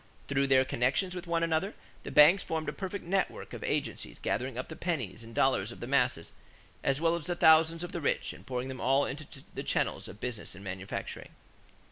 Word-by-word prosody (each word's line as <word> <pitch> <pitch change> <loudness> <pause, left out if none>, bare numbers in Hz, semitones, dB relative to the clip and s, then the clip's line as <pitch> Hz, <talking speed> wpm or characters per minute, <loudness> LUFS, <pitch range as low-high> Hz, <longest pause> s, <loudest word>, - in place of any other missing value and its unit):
Through 140 0 +2
their 130 -1 +5
connections 130 +11 +1
with 180 0 -6
one 170 0 +1
another, 165 +5 0 0.3
the - - -7
banks 160 +6 +7
formed 160 -2 -3
a 150 - -1
perfect 195 -1 -5
network 190 +3 -1
of - - -6
agencies - - -2
gathering 125 +1 -2
up 125 - -3
the 160 - -8
pennies 125 - -3
and 115 0 -12
dollars 120 -5 +2
of - - -10
the - - -5
masses 125 -10 +1 0.5
as 135 0 +2
well 165 +1 +3
as 170 -1 -5
the 175 - 0
thousands 160 +1 +5
of 175 - -5
the 170 - -4
rich 140 - 0
and - - -13
pouring 125 0 -2
them 130 -1 -6
all 135 +3 +3
into 145 +3 -6 0.3
the - - -4
channels - - -1
of 105 - -11
business 120 -6 -4
and 95 - -11
manufacturing. 95 0 -5
140 Hz, 210 wpm, -30 LUFS, 125-165 Hz, 0.5 s, banks